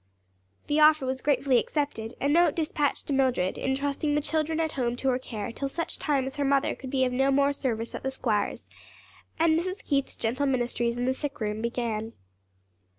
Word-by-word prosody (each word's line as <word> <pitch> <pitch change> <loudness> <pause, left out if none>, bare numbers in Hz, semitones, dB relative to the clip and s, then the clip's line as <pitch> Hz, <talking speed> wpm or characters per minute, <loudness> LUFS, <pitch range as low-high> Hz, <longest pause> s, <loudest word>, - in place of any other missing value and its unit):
The 295 +1 +1
offer 305 -2 +6
was 260 0 -2
gratefully 270 -3 +3
accepted, 255 -7 -3
a 280 - 0
note 330 +2 +4
dispatched 305 -3 -1
to 285 - -2
Mildred, 255 -9 +1
entrusting 280 +2 -1
the 295 - +2
children 315 +1 0
at 320 -1 0
home 245 -3 -1
to 265 +2 0
her 250 0 +1
care 220 -5 -5
till 275 +4 -3
such 335 +4 -3
time 280 -4 +1
as 265 +2 -6
her 285 - 0
mother 275 0 +2
could 260 - -8
be 260 -1 +2
of 250 - -1
no 270 +2 +2
more 280 +1 +3
service 230 -5 -2
at - - -5
the 265 - -1
squire's, 225 -6 -1 0.7
and 320 0 +4
Mrs. 370 +3 -4
Keith's 275 -2 0
gentle 255 +5 -1
ministries 240 -2 0
in 245 - -1
the 260 - +2
sick 290 +2 -4
room 210 -1 -2
began. 230 -2 -2
270 Hz, 200 wpm, -27 LUFS, 245-290 Hz, 0.7 s, offer